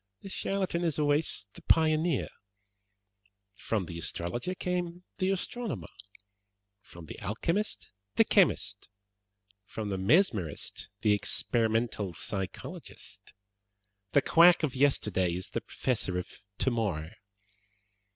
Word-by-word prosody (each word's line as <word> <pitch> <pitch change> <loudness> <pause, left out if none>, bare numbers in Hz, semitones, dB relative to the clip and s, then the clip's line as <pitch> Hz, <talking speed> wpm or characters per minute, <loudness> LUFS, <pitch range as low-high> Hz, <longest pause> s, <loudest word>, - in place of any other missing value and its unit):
"The 195 - -7
charlatan 190 -3 -1
is 165 -4 +1
always 145 -7 +1
the - - -13
pioneer. 160 -2 +3 1.3
From 105 -1 -2
the 85 0 -6
astrologer 95 - -3
came 180 -1 -2 0.2
the 185 - +2
astronomer, 195 - -2 0.9
from 85 -4 -12
the - - -9
alchemist 170 - -1 0.2
the - - +7
chemist, - - +2 0.7
from 105 0 -5
the 95 -1 -2
mesmerist 100 - +1
the 105 -2 +4
experimental 110 -2 0
psychologist. 95 +3 -6 0.8
The 140 - +5
quack 170 0 +7
of 145 -5 +1
yesterday 105 -10 +2
is 90 - -5
the - - -2
professor 105 -8 -1
of 90 +1 -6 0.2
tomorrow. 100 -11 0
120 Hz, 105 wpm, -30 LUFS, -, 1.3 s, the